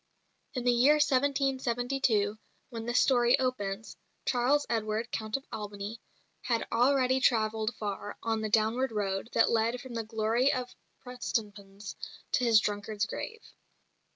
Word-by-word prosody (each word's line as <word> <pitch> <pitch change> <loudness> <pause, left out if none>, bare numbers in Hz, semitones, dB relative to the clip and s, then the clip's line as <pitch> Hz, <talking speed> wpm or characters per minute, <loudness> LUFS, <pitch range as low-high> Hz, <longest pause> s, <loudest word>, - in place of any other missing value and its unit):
In 250 - -2
the 245 - +4
year 255 +5 +5
1772, 260 -6 +1 0.3
when 230 -1 -6
this 240 +1 +3
story 245 -2 +4
opens, 225 -5 -3 0.3
Charles 265 +4 +2
Edward, 220 0 -2
Count 220 +2 -2
of 275 - -13
Albany, 210 +1 -6 0.4
had 230 -2 -1
already 260 +2 +3
travelled 220 -2 +1
far 205 -1 -5
on 225 -1 0
the 215 - -2
downward 225 +4 +2
road 200 0 -2
that 230 - +4
led 230 +2 +1
from 255 0 -9
the 230 -1 -2
glory 225 +4 +1
of 250 -1 -3 0.3
Prestonpans 205 -5 -5 0.4
to 250 - +2
his 230 -3 +6
drunkard's 205 0 -2
grave. 450 - -6
230 Hz, 135 wpm, -30 LUFS, 215-255 Hz, 0.4 s, his